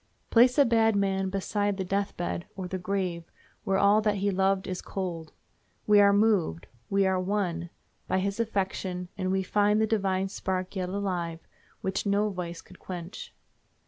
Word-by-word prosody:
Place 245 +3 +5
a 285 - +7
bad 225 -2 +3
man 195 -1 +1
beside 205 +1 -1
the 190 - -1
death 195 +2 -1
bed, 175 0 -3
or 190 -2 -5
the 185 +1 -4
grave, 180 -2 -2 0.4
where 195 0 +1
all 200 +2 +5
that 210 -1 +1
he 200 +1 0
loved 190 0 +1
is 185 -1 -4
cold—we 170 - -2
are 200 0 +6
moved, 200 - +2 0.2
we 195 0 +3
are 190 -1 +2
won, 180 -3 -1 0.4
by - - +1
his 200 +3 -1
affection, 190 -4 -2
and 185 0 -2
we 190 0 +1
find 210 +2 +2
the 220 - +3
divine 195 -3 0
spark 185 0 -3
yet 185 -1 -2
alive, 180 -4 -2 0.4
which 190 +2 -2
no 205 +1 +2
vice 175 -2 -5
could 185 - -17
quench. 175 0 -7
190 Hz, 170 wpm, -28 LUFS, 180-205 Hz, 0.4 s, a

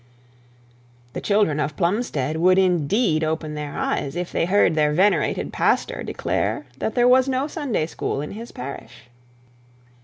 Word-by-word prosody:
The - - -5
children 200 -8 +2
of 150 0 -2
Plumstead 170 - -1
would 185 +3 +4
indeed 180 - +2
open 155 -1 -2
their 150 -1 -5
eyes 140 +2 -2
if 175 0 -3
they - - 0
heard 190 -1 +3
their 150 -1 +2
venerated 190 +6 +1
pastor - - 0
declare - - -2
that - - -2
there 245 -1 +4
were 255 +1 +6
no 265 +1 0
Sunday 290 - -2
schools 145 -3 -3
in 150 - -7
the 230 +2 -8
parish. 125 -2 -9
175 Hz, 150 wpm, -22 LUFS, 150-210 Hz, -, were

